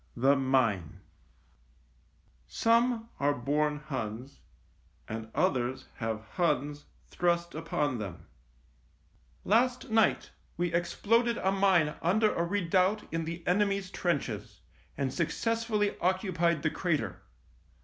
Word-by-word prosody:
THE 135 Hz, +4 st, +4 dB
MINE 130 Hz, -, +1 dB, 1.5 s
SOME 230 Hz, 0 st, +2 dB
ARE 145 Hz, +1 st, +2 dB
BORN 150 Hz, +4 st, 0 dB
HUNS, 130 Hz, -1 st, -5 dB, 0.7 s
AND 110 Hz, 0 st, -6 dB
OTHERS 125 Hz, 0 st, 0 dB
HAVE 110 Hz, -2 st, -3 dB
HUNS 145 Hz, -4 st, 0 dB, 0.3 s
THRUST 170 Hz, 0 st, 0 dB
UPON 150 Hz, -5 st, -1 dB
THEM 95 Hz, -5 st, -7 dB, 0.6 s
" -, -, -35 dB
Last 245 Hz, +1 st, +2 dB
night 225 Hz, 0 st, +2 dB, 0.3 s
we 175 Hz, -1 st, -1 dB
exploded 230 Hz, +7 st, +1 dB
a 190 Hz, -, +1 dB
mine 190 Hz, -6 st, +3 dB
under 210 Hz, +5 st, +3 dB
a 170 Hz, -, 0 dB
redoubt 185 Hz, +2 st, +1 dB
in 165 Hz, -1 st, -1 dB
the 170 Hz, +1 st, -6 dB
enemy's 195 Hz, 0 st, +1 dB
trenches, 170 Hz, -8 st, -2 dB, 0.4 s
and 135 Hz, -2 st, -1 dB
suc -, -, 0 dB
cessfully 225 Hz, -3 st, 0 dB
occupied 175 Hz, -4 st, +1 dB
the 160 Hz, -, +1 dB
crater. 110 Hz, -, -1 dB
170 Hz, 110 wpm, -30 LUFS, 135-200 Hz, 1.5 s, THE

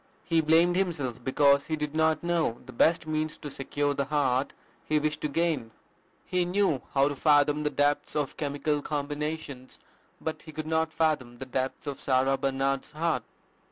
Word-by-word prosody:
He 165 Hz, -2 st, +2 dB
blamed 165 Hz, +3 st, +4 dB
himself 145 Hz, -11 st, -2 dB
because 140 Hz, +1 st, +3 dB
he 160 Hz, -, 0 dB
did 150 Hz, -1 st, -4 dB
not 160 Hz, 0 st, +2 dB
know 170 Hz, -9 st, 0 dB
"the -, -, -11 dB
best 165 Hz, +7 st, +3 dB
means 155 Hz, 0 st, -2 dB
to 145 Hz, -, -8 dB
secure 145 Hz, +1 st, -1 dB
the 140 Hz, 0 st, -1 dB
heart 135 Hz, -2 st, +1 dB, 0.3 s
he 155 Hz, -, +1 dB
wished 150 Hz, 0 st, -1 dB
to -, -, 0 dB
gain." 150 Hz, -5 st, 0 dB, 0.6 s
He 180 Hz, -1 st, +1 dB
knew 180 Hz, -6 st, +1 dB
how 135 Hz, 0 st, +5 dB
to 145 Hz, -, -4 dB
fathom 150 Hz, 0 st, +3 dB
the 150 Hz, -, 0 dB
depths 145 Hz, +1 st, 0 dB
of 145 Hz, -2 st, -1 dB
chemical 145 Hz, 0 st, -1 dB
combinations, 145 Hz, -2 st, -4 dB, 0.4 s
but 160 Hz, -, -4 dB
he 155 Hz, -, -11 dB
could 155 Hz, +1 st, -4 dB
not 160 Hz, 0 st, 0 dB
fathom 150 Hz, -7 st, 0 dB
the 135 Hz, -, -6 dB
depths 130 Hz, +2 st, -3 dB
of 140 Hz, -2 st, -4 dB
Sarah 135 Hz, 0 st, +2 dB
Barnard's 135 Hz, +1 st, -1 dB
heart. 165 Hz, +1 st, 0 dB
150 Hz, 175 wpm, -28 LUFS, 135-160 Hz, 0.6 s, how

